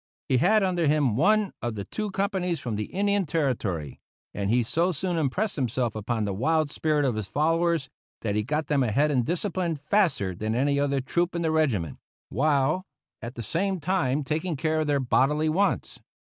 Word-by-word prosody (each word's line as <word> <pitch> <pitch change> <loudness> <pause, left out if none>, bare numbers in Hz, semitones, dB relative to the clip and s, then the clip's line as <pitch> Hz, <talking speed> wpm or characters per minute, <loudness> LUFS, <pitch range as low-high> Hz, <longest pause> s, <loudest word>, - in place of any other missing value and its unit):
He 130 - +4
had 215 - +4
under 175 -4 +1
him 145 -6 +2
one 210 - +3
of 120 -2 -3
the 100 -1 -5
two 215 -1 -4
companies 190 -3 -1
from 115 -4 -4
the 105 0 -2
Indian 200 - 0
Territory; 115 - -2 0.3
and 100 -1 -2
he 120 +2 +3
so 170 +10 +1
soon 180 +2 -2
impressed 165 +8 -1
himself 120 -3 -1
upon 110 +1 -2
the 100 - -2
wild 155 +8 +1
spirit 150 -2 +1
of 130 - +1
his 110 -2 -4
followers, 165 - +1 0.3
that 105 -3 -1
he 105 - +1
got 150 +7 -1
them 145 -1 +1
ahead 135 +6 +2
in 130 -3 +2
discipline 175 - -1
faster 150 - +1
than 110 +5 -3
any 140 +3 +2
other 140 -1 +1
troop 175 +7 -1
in 170 - -1
the 160 - +1
regiment, 120 - 0 0.3
while 145 - +1 0.4
at 120 +1 -7
the 115 - -5
same 190 - -1
time 150 -5 0
taking 155 +4 -2
care 155 +2 0
of 155 - 0
their 145 -1 +2
bodily 150 +4 +2
wants. 195 +6 0
150 Hz, 190 wpm, -26 LUFS, 120-170 Hz, 0.4 s, He